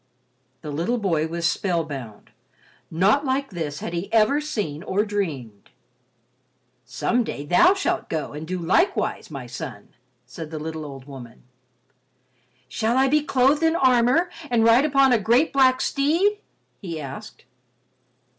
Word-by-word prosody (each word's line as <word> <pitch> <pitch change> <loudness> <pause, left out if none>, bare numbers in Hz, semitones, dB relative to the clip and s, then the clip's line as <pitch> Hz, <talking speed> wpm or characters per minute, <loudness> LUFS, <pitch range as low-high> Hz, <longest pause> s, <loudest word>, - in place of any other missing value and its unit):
The 150 - -6
little 170 +12 -1
boy 165 -8 0
was 170 +1 -1
spell 175 -2 0
bound. 130 -9 -9 0.6
Naught 195 - +2
like 275 -1 -1
this 155 -5 -5
had 170 - -5
he 175 +4 -4
ever 230 +6 +3
seen 205 - -4
or 200 +3 -1
dreamed. 145 - -4 1.2
"Some 180 - 0
day 145 -9 -6
thou 345 - +5
shalt 360 -2 -2
go 155 -3 -3
and 150 +2 -7
do 185 +1 -3
likewise, 190 - 0
my 135 -5 -7
son," 120 -4 -8 0.4
said 150 +5 -9
the 160 - -6
little 160 0 -5
old 135 -2 -10
woman. 130 -5 -12 1.2
"Shall 230 +3 -1
I 265 0 +3
be 300 +2 +3
clothed 275 +1 +2
in 325 0 +2
armor 260 +4 +3 0.2
and 235 -2 +2
ride 230 +5 +5
upon 275 -3 +4
a 235 - +3
great 235 +9 +2
black 260 -1 +4
steed?" 335 +9 +1 0.4
he 170 -6 -6
asked. 135 -3 -9
200 Hz, 145 wpm, -23 LUFS, -, 1.2 s, thou